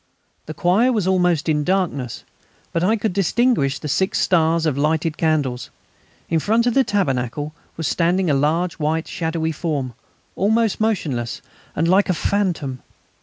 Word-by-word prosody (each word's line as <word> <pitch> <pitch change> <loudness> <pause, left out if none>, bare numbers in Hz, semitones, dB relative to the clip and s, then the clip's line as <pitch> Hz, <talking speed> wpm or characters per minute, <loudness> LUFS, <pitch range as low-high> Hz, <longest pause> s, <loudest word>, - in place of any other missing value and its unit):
The 155 - -6
choir 200 - +3
was 215 -7 0
almost 180 -4 +2
in 150 -2 +1
darkness, 165 -9 -1 0.5
but 165 - 0
I 215 +5 +3
could 220 -3 -2
distinguish 195 - +1
the - - -6
six 190 +7 0
stars 165 -2 +2
of 155 - +2
the 140 - -2
lighted 160 +1 0
candles. 145 -7 -1 0.6
In 165 - +1
front 225 +7 +1
of 245 - +2
the 270 - +4
tabernacle 145 - -1 0.2
was 160 -2 -2
standing 175 +6 +1
a 150 - +2
large 160 +6 0
white 160 +2 -1
shadowy 160 -1 -2
form, 145 -6 -3 0.4
almost 220 +2 +1
motionless 145 - -1 0.3
and 165 - +1
like 190 +3 +3
a 185 - +2
phantom. 165 -9 -1
165 Hz, 160 wpm, -21 LUFS, 150-190 Hz, 0.6 s, the